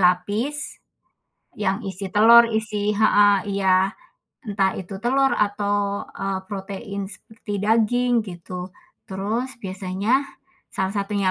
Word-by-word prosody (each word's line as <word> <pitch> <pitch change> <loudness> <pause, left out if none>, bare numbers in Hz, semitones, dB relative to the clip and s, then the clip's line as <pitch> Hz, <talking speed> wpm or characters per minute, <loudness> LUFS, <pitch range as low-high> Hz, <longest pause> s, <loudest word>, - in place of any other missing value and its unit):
lapis 205 +11 0 0.8
yang 200 +1 0
isi 190 0 -5
telur, 230 +2 +8
isi 215 -2 -1
heeh, 205 -2 +5
iya. 190 -1 +2 0.6
Entah 195 -2 +1
itu 190 +1 -7
telur 270 +3 +2
atau, 205 -1 0
eee, 195 -1 -2
protein 200 0 -6
seperti 220 -1 -8
daging, 230 +3 +2
gitu. 180 0 -7 0.4
Terus 215 +7 -2
biasanya 195 +7 0 0.5
salah 190 0 -2
satunya 200 -1 0
205 Hz, 105 wpm, -23 LUFS, 190-220 Hz, 0.8 s, telur